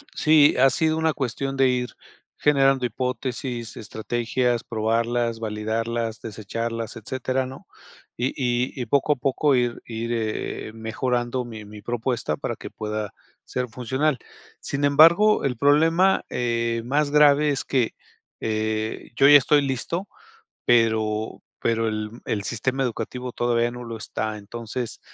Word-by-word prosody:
sí, 155 -2 +5
ha 135 - +7
sido 160 +4 +1
una 160 -1 +2
cuestión 135 0 -3
de 135 -1 +5
ir 125 -1 0 0.5
generando 135 -3 +3
hipótesis, 125 -1 -3
estrategias, 120 +2 -1
probarlas, 115 +1 0
validarlas, 115 +1 -2
desecharlas, 115 +1 -4
etcétera, 130 +3 -2
¿no? 130 - -11 0.5
Y 120 +2 +1
y 125 +1 -1
y 125 - -2
poco 140 +5 +2
a - - -8
poco 135 +2 +1
ir 120 -1 0
ir, 115 +1 -4
eh 110 -2 -3
eh 110 - -10
mejorando 120 +2 -2
mi 110 -3 -9
mi 105 0 -11
propuesta 120 -7 -2
para - - -3
que - - -9
pueda 105 -1 -4 0.3
ser 125 0 -3
funcional. 130 +4 -1 0.4
Sin 140 +1 -3
embargo, 165 +9 +6
el 125 -3 -1
problema, 165 +8 +4
eh, 115 -1 -1
más 145 +3 +1
grave 150 0 +5
es 140 - -1
que, 125 -4 +1 0.5
eh, 110 0 -2
yo 140 - +6
ya 145 0 +10
estoy 145 +2 +3
listo, 140 +8 -2 0.6
pero 110 -2 +2 0.2
pero 115 -1 +1
el 110 0 -3
el 100 -2 -2
sistema 130 +5 -1
educativo 125 +1 -4
todavía 120 0 +1
no 125 0 -8
lo 115 -1 -6
está. 110 0 -4
Entonces 115 +3 -6
120 Hz, 140 wpm, -24 LUFS, 115-135 Hz, 0.6 s, ya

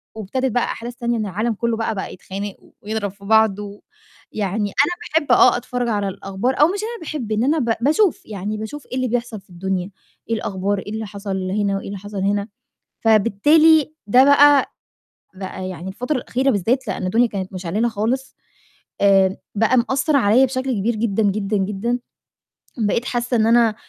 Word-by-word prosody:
وابتدِت 250 +5 -2
بقى 245 - +1
أحداث 240 +1 -6
تانية 240 -2 -1
إن 215 - -2
العالم 215 +5 -1
كلّه 230 +1 -1
بقى، 225 -1 -2
بقى 190 - -5
يتخانق 195 +2 -6
و - - -23
ويضرَب 210 -2 -3
في 200 0 -16
بعض، 220 -2 +4
و 205 0 -8 0.5
يعني 205 0 -2
أنا 320 -1 0
باحب - - 0
آه، - - +6
أتفرّج 245 0 -3
على 205 -2 0
الأخبار 195 +9 -2
أو 300 - +8
مش 390 +3 -3
أنا 460 -3 -5
باحب 290 -9 -5
إن 215 +3 +1
أنا 305 +4 +2
ب 230 -3 +1
باشوف، 315 - +2
يعني 210 +1 -4
باشوف 275 +7 -7
إيه - - -6
اللي 255 0 0
بيحصل 235 -3 -3
في - - -33
الدنيا، 185 +1 -3 0.4
إيه 230 - +1
الأخبار، 200 -2 -2
إيه 205 - -8
اللي 220 0 -4
حصل 195 -2 -4
هنا 200 -1 0
وإيه - - -7
اللي 200 0 -5
حصل 205 +1 -8
هنا. 200 +1 0 0.5
فبالتالي 295 +9 +4
ده 250 +6 +6
بقى 285 0 +5 0.6
بقى 185 -1 -6
يعني 180 0 -7
الفترة 250 +9 -2
الأخيرة 260 +2 0
بالذّات 230 +4 0
لإن 190 -1 -3
الدنيا 230 +6 +3
كانت 190 -2 -5
مِشعللة 190 +6 -1
خالص، 235 +5 -2 0.7
آمم، 195 -1 +4 0.2
بقى 225 +4 +2
مأثّر 270 +4 +1
عليّا 240 +2 +5
بشكل 260 0 -2
كبير 220 +3 0
جدًا، 220 -1 0
جدًا، 205 +1 0
جدًا، 210 +5 -1 0.8
بقيت 225 +2 0
حاسّة 240 -1 -1
إن 220 0 +3
أنا 230 -2 +4
220 Hz, 185 wpm, -20 LUFS, 200-250 Hz, 0.8 s, أو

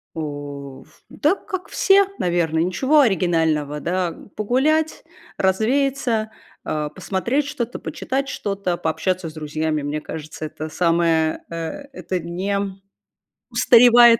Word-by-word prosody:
У 145 -3 -6
в 155 - -25
да, 310 +7 +2
как 375 -3 -6
все, 395 0 +5
наверное, 165 -2 +1
ничего 265 - +3
оригинального, 160 - +1
да. 180 +2 -1 0.2
Погулять, 295 +9 +1 0.3
развеяться, 225 +2 +1 0.3
а, 150 -1 -2
посмотреть 235 - -1
что-то, 245 -4 -4
почитать 270 +1 -3
что-то, 195 -7 -2
пообщаться 180 +2 -1
с - - -13
друзьями. 155 0 -2
Мне 145 +1 -2
кажется, 155 0 -7
это 155 +1 -6
самое, 165 -1 +2
э, 170 - -6 0.4
это 185 -8 -3
не, 175 +4 -4
м, 200 -1 -2 0.7
устаревает 240 -1 +7
185 Hz, 120 wpm, -22 LUFS, 160-240 Hz, 0.7 s, устаревает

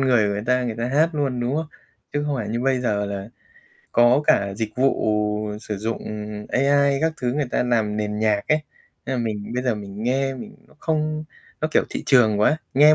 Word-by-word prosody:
người 125 -5 +4
của 100 - 0
người 100 - -3
ta, 125 0 +3
người 115 -2 -2
ta 115 - -1
hát 155 +5 +3
luôn, 135 -5 -1
đúng 125 +4 0
hông? 160 +1 -1 0.5
Chứ 145 0 0
không 145 -2 0
phải 110 -4 -3
như 115 +2 -2
bây 130 0 +1
giờ 105 -4 0
là 100 0 -5 0.6
có 120 +4 +5
cả 100 -1 +3
dịch 110 0 -2
vụ 135 +2 +2 0.6
sử 105 -2 -4
dụng, 110 +3 -2
ừm, 105 0 -6
AI 140 +1 +3
các 160 +1 +2
thứ 125 -1 0
người 145 -1 -1
ta - - +1
làm 110 -4 +1
nền 105 0 -2
nhạc 105 -1 +2
ấy, 155 - +4 0.5
nên 130 - -1
là - - 0
mình 105 -1 -4
bây 125 - -1
giờ 125 -3 +1
mình 100 0 -7
nghe 135 +3 +1
mình 130 - -9
nó - - -21
không 155 -1 -1 0.4
nó, 155 - 0
kiểu, - - +3
thị - - -4
trường 110 -6 +5
quá, 150 +9 +4 0.2
nghe 150 +3 +7
125 Hz, 225 wpm, -23 LUFS, 105-140 Hz, 0.6 s, nghe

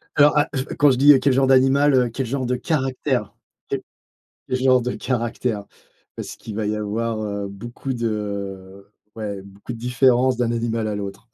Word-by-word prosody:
Alors, 145 0 +6
ah 145 - +3
je 130 -1 -1
quand 145 0 +3
je 125 - +1
dis, 145 +3 +8
heu, 135 - +4
quel 135 +1 +2
genre 135 +1 +3
d'animal, 135 +2 +4
heu, 125 -2 +3
quel 130 +3 -3
genre 130 +2 -2
de 125 - 0
caractère. 135 -3 -1 0.4
Et. - - -1 0.7
Le 130 - 0
genre 130 0 +4
de 125 +1 -2
caractère, 120 -3 -2 0.5
parce - - -7
qu'il 110 - -9
va 110 - -1
y 105 - 0
avoir, 110 +1 -2
heu, 100 -1 -3
beaucoup 120 +6 -6
de 100 -4 -4 0.3
ouais 100 -3 -5
beaucoup 100 +4 -9
de - - -9
différences 125 +1 +3
d'un 120 -1 +1
animal 115 -1 -1
à 105 - -2
l'autre. 100 +3 -6
120 Hz, 190 wpm, -22 LUFS, 105-130 Hz, 0.7 s, dis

